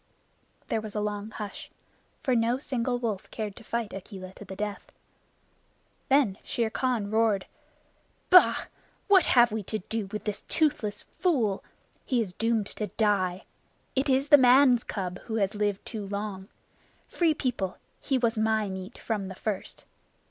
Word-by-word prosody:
There 220 - 0
was 215 -1 -8
a - - 0
long 210 0 -3
hush, 210 -2 -7 0.5
for 260 - +2
no 235 +2 +2
single 255 -2 -1
wolf 220 -6 -3
cared 210 -3 -5
to - - -11
fight 230 -1 -3
Akela 190 -1 -8
to - - -11
the 195 - -8
death. 205 0 -5 1.2
Then 265 -8 +3
Shere 230 -2 -1
Khan 235 -6 -1
roared: 220 -3 +2 0.9
"Bah! 365 0 +7 0.4
What 390 -4 +6
have 240 -2 +5
we 220 0 -2
to 215 - -2
do 215 +1 -4
with 210 +2 -5
this 210 -1 -3
toothless 215 -10 0 0.2
fool? 240 - +1 0.4
He 250 - 0
is 200 -6 -2
doomed 225 0 +1
to 210 - -2
die! 190 -5 0 0.5
It 270 +2 +1
is 270 +2 +2
the 290 -2 +9
man 255 0 +6
cub 185 -4 -4
who 225 - -3
has 205 -1 +1
lived 205 -2 -1
too 210 -3 -5
long. 200 -1 -4 0.6
Free 330 -3 +2
People, 230 -10 -2 0.2
he 270 - 0
was 235 -2 +1
my 220 -1 +1
meat 190 +3 -7
from 210 -4 -3
the 190 - -7
first. 205 0 -4
220 Hz, 160 wpm, -28 LUFS, 200-245 Hz, 1.2 s, the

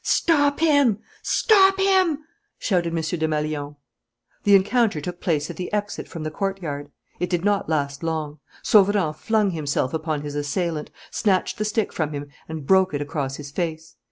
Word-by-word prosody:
"Stop 290 -3 +2
him! 285 -9 +4 0.2
Stop 390 -3 +4
him!" 375 -6 +3 0.3
shouted 175 -5 0
M. - - -3
Desmalions. 155 -2 -2 0.7
The 200 -1 +7
encounter 205 -2 +3
took 175 +4 -6
place 155 -2 0
at 165 - -11
the 180 - -5
exit 205 -1 -3
from 165 -3 -7
the 155 - -3
courtyard. 155 -6 -3 0.3
It 180 - -1
did 175 0 -1
not 205 -5 +1
last 140 -3 -1
long. 155 -2 -3 0.2
Sauverand 200 -6 +4
flung 215 -3 +1
himself 145 -4 -1
upon 155 -2 -2
his 145 -1 -5
assailant, 150 +2 -2 0.2
snatched 190 -2 0
the 215 - 0
stick 215 0 -1
from 155 -2 -2
him, 145 0 -5 0.2
and 160 -3 -6
broke 190 0 +4
it 145 - -2
across 140 -2 -3
his 145 -1 -8
face. 160 0 -4
170 Hz, 165 wpm, -23 LUFS, 150-205 Hz, 0.7 s, The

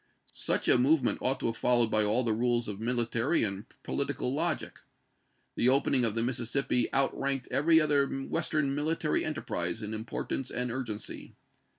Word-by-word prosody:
Such - - -1
a - - +6
move 140 +3 +4
ment - - 0
ought 130 +1 0
to - - -3
have 115 0 -1
followed 120 -2 +3
by 110 - +3
all 110 +5 +2
the 115 -2 +1
rules 120 +1 +1
of 105 -1 -5
military 120 +4 +1
and 100 0 -3 0.2
political 135 -2 -2
logic. 160 +2 -2 0.7
The 120 - +2
opening 130 -1 +3
of 110 -1 -1
the 115 - 0
Mississippi 125 0 0
outranked 135 -1 0
every 160 +3 +4
other 145 -3 +2
Western 140 +1 -1
military 150 +2 0
enterprise 110 - -3
in 105 +1 -4
importance 115 +4 -4
and 125 -1 -2
urgency. 115 -4 -6
125 Hz, 165 wpm, -30 LUFS, 115-140 Hz, 0.7 s, a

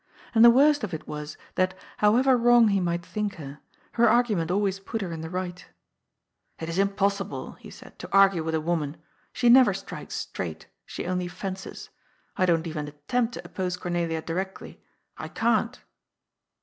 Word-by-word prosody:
And 225 -1 +6
the 235 - +10
worst 285 +3 +4
of 185 -6 -3
it 155 - -9
was 150 0 -6 0.2
that, 185 0 0 0.2
however 250 +6 +4
wrong 240 -2 +5
he 200 -1 +2
might 175 -1 -2
think 210 0 -3
her, 145 -2 -9 0.3
her 235 -1 +4
argument 215 -8 +2
always 195 +1 0
put 220 +3 -5
her 180 - -5
in 160 -1 -5
the 160 - -6
right 180 0 -5 0.5
*' - - -46
It 160 - -5
is 165 +3 -2
impossible," 200 0 -1
he - - -12
said, - - -13
^' - - -41
to - - -8
argue 195 -4 +5
with 160 0 -1
a 160 - 0
woman. 155 -2 -2 0.3
She 245 - 0
never 255 +2 +7
strikes - - -7
straight; - - -5 0.2
she - - -6
only 180 0 -1
fences. 190 +1 -7 0.4
I 185 -2 +2
don't 165 -1 +2
even 155 -2 -4
attempt 225 +12 -2
to - - -8
oppose 180 -1 -3
Cornelia 170 -3 -2
directly. 190 +4 -5 0.4
I - - -5
can't." 230 +1 0
190 Hz, 180 wpm, -26 LUFS, 165-220 Hz, 0.5 s, the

